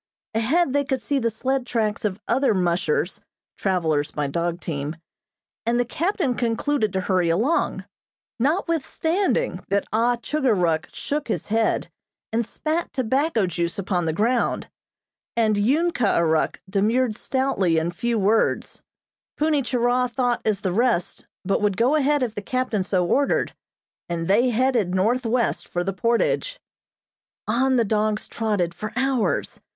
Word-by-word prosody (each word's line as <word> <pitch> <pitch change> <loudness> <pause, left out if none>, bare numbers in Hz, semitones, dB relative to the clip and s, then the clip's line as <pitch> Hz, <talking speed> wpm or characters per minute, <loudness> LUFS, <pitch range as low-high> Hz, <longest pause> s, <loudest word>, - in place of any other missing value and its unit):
Ahead 260 +7 +2
they 285 0 +2
could 265 -2 -1
see 280 +3 -1
the 230 -2 +1
sled 260 +4 -1
tracks 215 -3 -1
of 200 -1 -1
other 265 -5 +2
"mushers" 175 -1 0 0.3
(travelers 160 -6 0
by 150 - -2
dog 170 +4 -2
team), 150 -2 -4 0.7
and 235 +1 +1
the 245 - +2
captain 335 - 0
concluded 235 0 0
to 190 - 0
hurry 185 -2 +1
along, 225 - +1 0.5
notwithstanding 335 - 0
that 200 0 +1
Ah 235 +2 +3
Chugor 260 0 0
Ruk 165 -4 0
shook 295 +1 -3
his 220 - -3
head, 225 +1 +1 0.5
and 230 +1 +2
spat 315 +8 -2
tobacco 260 -1 +1
juice 170 -1 -2
upon 185 -3 -1
the - - +2
ground, 230 +8 0 0.7
and 215 -3 +3
Ung 300 +11 +2
Kah 235 -9 +1
Ah - - +3
Ruk 160 -1 +1
demurred 215 +4 +1
stoutly 235 -10 0
in 160 +2 0
few 235 +6 -1
words. 215 +2 +1 0.6
Punni 305 -1 +2
Churah 250 0 +1
thought 245 -1 0
as 210 -3 0
the 185 -4 -1
rest, 230 -5 0 0.2
but 195 +2 +1
would 205 -2 +1
go 245 +6 +3
ahead 295 -2 +2
if 235 -4 -2
the 205 - -5
captain 255 -2 -1
so 185 -1 +1
ordered, 275 +10 +1 0.6
and 165 -1 -2
they 230 +6 +4
headed 235 -6 +1
northwest 235 +4 +1
for 175 - -2
the 195 +2 -2
portage. 235 - 0 0.9
On 260 +4 +2
the 235 -2 +3
dogs 215 0 0
trotted 205 -7 -1
for 210 +5 -6
hours. 260 -2 0
225 Hz, 150 wpm, -23 LUFS, 190-260 Hz, 0.9 s, they